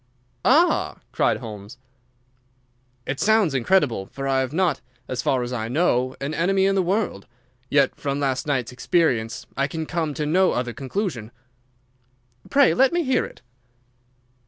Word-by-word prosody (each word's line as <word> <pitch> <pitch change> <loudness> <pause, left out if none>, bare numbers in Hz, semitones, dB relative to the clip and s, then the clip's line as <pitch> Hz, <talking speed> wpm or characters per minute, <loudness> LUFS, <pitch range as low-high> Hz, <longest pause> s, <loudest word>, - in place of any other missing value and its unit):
"Ah!" 320 +8 +3
cried - - +1
Holmes. 105 0 -9 1.3
"It 135 - -3
sounds 215 -7 +3
incredible, 130 - +1
for 135 0 -5
I 135 -1 +2
have 130 -1 -1
not, 170 -3 0 0.3
as 125 -1 -3
far 130 +1 +1
as 120 +1 -5
I 110 -2 -3
know, 130 -2 +1
an 140 +3 -3
enemy 190 +3 +2
in 195 - +3
the 195 - +2
world. 185 - -1 0.4
Yet 140 -2 +3
from 140 -1 -3
last 135 0 -1
night's 130 -5 -1
experience 125 -4 0
I 140 +1 +1
can 160 0 -4
come 160 -3 -2
to 150 - -2
no 185 +5 +3
other 125 -1 -2
conclusion." 135 - -4 1.2
"Pray 280 -1 +5
let 265 +1 +4
me 345 0 +1
hear 265 -3 +1
it." - - -14
140 Hz, 155 wpm, -23 LUFS, 125-185 Hz, 1.3 s, Pray